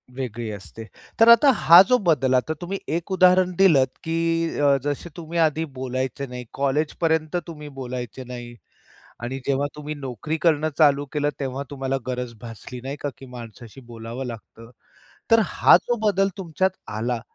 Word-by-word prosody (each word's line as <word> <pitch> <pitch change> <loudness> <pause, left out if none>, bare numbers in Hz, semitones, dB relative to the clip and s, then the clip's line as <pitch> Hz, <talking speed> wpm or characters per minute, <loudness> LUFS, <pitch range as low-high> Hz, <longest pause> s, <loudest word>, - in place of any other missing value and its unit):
वेगळी 120 -3 -4
असते. 105 +2 -9 0.3
तर 225 - +7
आता 235 +5 +8
हा 170 -2 +8
जो 250 - +5
बदल 135 -5 +3
आता 130 +5 +1
तुम्ही 190 +3 -4 0.2
एक 170 +3 -4
उदाहरण 185 0 +4
दिलंत, 155 -9 +5 0.2
की 165 0 -1
अ, 140 -1 +4
जसे 145 +4 -3
तुम्ही 170 0 -4
आधी 160 0 +2
बोलायचे 130 +1 -3
नाही, 125 0 -8
कॉलेजपर्यंत 155 +3 0
तुम्ही 150 -3 -9
बोलायचे 125 0 -6
नाही 120 -1 -9 0.7
आणि 130 +3 -4
जेव्हा 140 +1 +1
तुम्ही 150 0 -6
नोकरी 140 +3 -4
करणं 155 -2 +2
चालू 145 -2 +4
केलं 145 -1 +1
तेव्हा 135 0 -3
तुम्हाला 135 -1 -2
गरज 125 -1 -4
भासली 120 +2 -9
नाही 135 +2 -4
का, 145 - -3
की 135 - -12
माणसाशी 120 0 -11
बोलावं 115 +2 -7
लागतं. 115 -1 -10 0.6
तर 230 0 +6
हा - - +5
जो 240 - -1
बदल 195 -1 +3
तुमच्यात 185 +1 0 0.3
आला 120 +2 -2
140 Hz, 160 wpm, -23 LUFS, 125-165 Hz, 0.7 s, आता